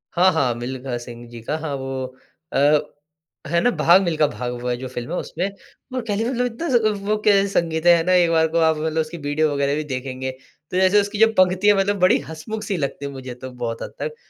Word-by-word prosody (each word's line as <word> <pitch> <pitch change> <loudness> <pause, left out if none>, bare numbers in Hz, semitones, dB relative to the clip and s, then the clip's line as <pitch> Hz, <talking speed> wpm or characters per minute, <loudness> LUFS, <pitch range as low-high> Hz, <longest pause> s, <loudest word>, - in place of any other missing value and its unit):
हाँ, 185 +2 +5
हाँ, 130 -7 +1
मिल्खा 125 +1 -4
सिंह 120 0 -10
जी 120 -1 -10
का 150 +7 -2
हाँ 155 -3 -4
वो 135 -1 -4 0.5
अ, 145 +2 +4 0.7
है 170 +3 +2
ना 245 - +3
भाग 180 0 +5
मिल्खा 160 -3 +2
भाग 125 -3 -4
वो 125 - -4
है, 120 - 0
जो 130 +1 -6
फिल्म 120 -1 -6
है 180 - -1
उसमें। 180 +5 -3 0.5
और 255 - -1
कह 205 - 0
ली 220 - 0
मतलब 250 -1 0
इतना 245 +8 -4
ज़ 245 - +5 0.3
वो 215 0 +2
कैसा 200 -1 +5
संगीत 165 0 -3
है, 175 0 +8
है 165 - 0
ना 185 - +3
एक 175 -2 +4
बार 160 -1 +3
को 165 +1 -2
आप 160 -1 +3
मतलब 160 +1 0
उसकी 155 +2 -6
वीडियो 145 0 0
वगैरह 140 0 0
भी 155 - -2
देखेंगे, 130 0 -4
तो 145 +6 -10
जैसे 190 +2 +5
उसकी 205 +1 -4
जो 225 - +7
पंक्ति 185 +2 +3
है, 205 - +8
मतलब 200 0 +1
बड़ी 185 - +4
हँसमुख-सी 195 +5 -4
लगती 140 -1 -3
है, 140 - -4
मुझे 130 -2 -7
तो 130 +1 -8
बहुत 120 -2 -5
हद - - -8
तक। 465 -1 -3
160 Hz, 245 wpm, -22 LUFS, 130-185 Hz, 0.7 s, है